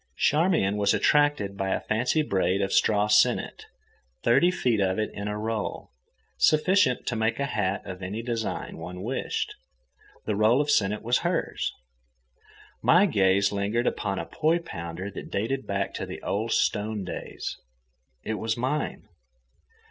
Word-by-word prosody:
Charmian 150 - +2
was 100 -1 +3
attracted 145 -10 +2
by 95 -1 -2
a - - +1
fancy 125 +8 0
braid 95 -6 +1
of 95 - -2
straw 105 -1 +3
sennit, 105 0 +2 0.6
thirty 120 +10 +4
feet 125 - +1
of 95 -1 +1
it 110 0 -1
in 100 0 -5
a 105 0 -3
roll, 110 - -4 0.5
sufficient 155 -3 +3
to 125 - -1
make 110 +3 0
a 140 - +1
hat 105 -6 -1
of 95 0 -7
any 100 +5 -4
design 115 -2 -3
one 90 +3 -7
wished; 425 - -2 0.7
the 105 - -1
roll 110 +5 +4
of 145 0 +1
sennit 105 -2 +1
was 120 +2 +2
hers. 170 0 -1 1.1
My 180 +5 +5
gaze 95 - +3
lingered 105 +4 -1
upon 100 -2 -1
a - - -3
poi 160 +2 +1
pounder 90 - -6
that - - -8
dated 130 +7 -2
back 100 0 -2
to - - -4
the - - -7
old 110 +3 -2
stone 105 -1 0
days; 90 - -6 0.6
it 110 -1 -3
was 110 +1 -1
mine. 130 +5 -2
110 Hz, 155 wpm, -26 LUFS, 100-135 Hz, 1.1 s, My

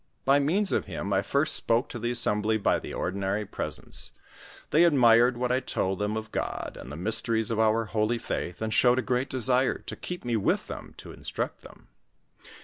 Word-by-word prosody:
By 140 +1 +5
means 185 +8 +1
of - - 0
him 100 - -4
I 95 - +3
first 140 +8 +2
spoke 115 +2 +3
to 120 - -6
the 120 +2 -2
assembly 110 -2 +1
by 105 - +1
the - - -8
ordinary 100 +3 -2
presents; - - -4 0.6
they 160 +3 +5
admired 120 -6 +5
what 125 0 -1
I 130 - +2
told 95 -7 -2
them 105 +1 -1
of 110 0 -6
God, - - -4
and 65 - -9
the - - -6
mysteries 110 +5 +1
of 110 - -1
our 110 +1 +2
holy 110 +2 0
faith, 90 -3 -4
and 110 0 -2
showed 125 +2 +4
a 130 - 0
great 125 +3 -1
desire 130 0 +1
to - - -8
keep 180 -5 -7
me 120 -1 0
with 100 - 0
them - - -9
to - - -10
instruct - - -5
them. - - -16
115 Hz, 200 wpm, -27 LUFS, 105-130 Hz, 0.6 s, By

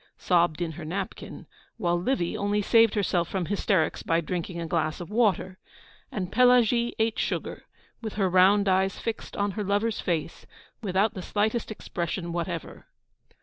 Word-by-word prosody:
sobbed 175 -2 +2
in 165 - -3
her 160 +1 -8
napkin; 185 +4 -5 0.3
while 175 -6 +1
Livy 175 0 0
only 205 +1 0
saved 225 +2 +4
herself 180 -4 +1
from 190 -3 -2
hysterics 200 -2 0
by 165 0 +1
drinking 170 +1 -4
a 170 - -3
glass 160 -1 -1
of 175 +2 -8
water, 195 -5 +1 0.5
and 185 -3 -4
Pelagie 240 -1 +4
ate 220 0 0
sugar, - - -3 0.4
with 220 -2 -5
her 195 -2 +1
round 190 +3 +5
eyes 190 0 +2
fixed 225 -1 -5
on 200 0 0
her 210 +2 -3
lover's 205 +3 0
face, 165 -2 -3 0.3
without 200 +1 +1
the 185 - -6
slightest 215 +5 -1
expression 170 -4 -4
whatever. 170 -1 -5
190 Hz, 155 wpm, -27 LUFS, 175-215 Hz, 0.5 s, round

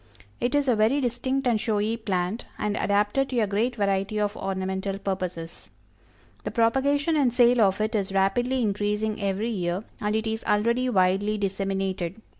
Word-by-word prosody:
It 245 +3 0
is 290 -1 +2
a 245 - +4
very 220 +6 +3
distinct 260 +2 -1
and 230 -4 +2
showy 215 0 0
plant, 200 -1 -2
and 210 0 -1
adapted 205 +8 +1
to 250 - 0
a - - +3
great 215 +5 0
variety 200 0 0
of 205 0 -1
ornamental 190 0 -3
purposes. 180 -4 -5 0.7
The - - -3
propagation 280 +7 +2
and 275 -5 +3
sale 245 0 +4
of 195 -1 +3
it 215 +1 -1
is 200 -2 -1
rapidly 240 +7 +1
increasing 210 +1 -1
every 200 +3 -1
year, 180 -1 -2 0.2
and 210 +1 -1
it 220 0 0
is 220 0 -3
already 235 +5 +2
widely 195 0 +2
disseminated. 195 -1 -2
210 Hz, 165 wpm, -25 LUFS, 195-235 Hz, 0.7 s, a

